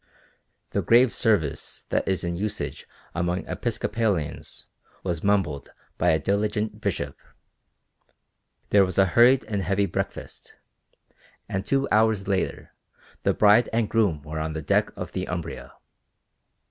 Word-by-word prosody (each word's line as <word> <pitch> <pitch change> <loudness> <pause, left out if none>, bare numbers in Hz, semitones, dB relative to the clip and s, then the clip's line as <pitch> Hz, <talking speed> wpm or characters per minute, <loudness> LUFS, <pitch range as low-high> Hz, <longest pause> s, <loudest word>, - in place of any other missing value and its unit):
The - - 0
grave 120 +1 +5
service 95 -11 0
that - - 0
is 95 -1 0
in 85 0 -2
usage 105 +4 -3 0.3
among 90 +1 -1
Episcopalians 105 - -2 0.4
was 85 -4 -3
mumbled 95 -9 0 0.3
by - - +3
a 80 - +4
diligent 105 +4 -1
bishop, 75 -9 -2 1.6
there 100 -1 +6
was 95 -2 -2
a 95 - +6
hurried 120 +8 +5
and 105 -2 -2
heavy 100 +2 +1
breakfast, - - -5 0.9
and 95 -1 -2
two 135 0 +2
hours 110 -2 +3
later 95 -2 -2 0.5
the - - +1
bride 105 +2 +5
and 115 -1 +1
groom 100 -11 +1
were 80 0 -5
on 80 0 -3
the 80 -1 -5
deck - - +2
of - - -5
the - - -3
"Umbria." - - -5
100 Hz, 135 wpm, -25 LUFS, 85-110 Hz, 1.6 s, there